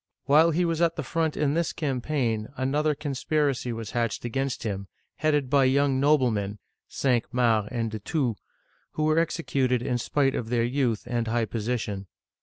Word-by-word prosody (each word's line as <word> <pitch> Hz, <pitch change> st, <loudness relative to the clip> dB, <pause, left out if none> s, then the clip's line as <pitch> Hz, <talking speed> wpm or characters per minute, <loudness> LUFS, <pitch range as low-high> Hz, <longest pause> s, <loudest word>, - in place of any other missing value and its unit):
While 155 Hz, +4 st, +6 dB
he 170 Hz, +2 st, +1 dB
was 165 Hz, -1 st, -1 dB
at 165 Hz, -1 st, +3 dB
the -, -, -3 dB
front 160 Hz, -2 st, -1 dB
in 145 Hz, -1 st, +1 dB
this 170 Hz, 0 st, 0 dB
campaign, 125 Hz, -6 st, -1 dB
another 150 Hz, +3 st, +1 dB
conspiracy 140 Hz, -2 st, -1 dB
was 115 Hz, -2 st, -5 dB
hatched 120 Hz, -1 st, -1 dB
against 135 Hz, +3 st, -2 dB
him, 100 Hz, -3 st, -3 dB, 0.3 s
headed 150 Hz, -3 st, +1 dB
by 140 Hz, 0 st, +4 dB
young 135 Hz, 0 st, +3 dB
noblemen 120 Hz, -9 st, +2 dB, 0.3 s
(Cinq 125 Hz, -4 st, 0 dB
Mars 115 Hz, -4 st, +2 dB
and 115 Hz, -2 st, -2 dB
De 110 Hz, -, -4 dB
Thou), 135 Hz, -8 st, 0 dB, 0.6 s
who 155 Hz, -, -1 dB
were 155 Hz, +1 st, +3 dB
executed 135 Hz, -7 st, 0 dB
in 125 Hz, -2 st, -1 dB
spite 135 Hz, +2 st, +1 dB
of 115 Hz, -, -3 dB
their 120 Hz, -1 st, +2 dB
youth 120 Hz, -3 st, 0 dB
and 120 Hz, -1 st, -2 dB
high 115 Hz, 0 st, +1 dB
position. 105 Hz, -3 st, -3 dB
130 Hz, 170 wpm, -26 LUFS, 115-150 Hz, 0.6 s, While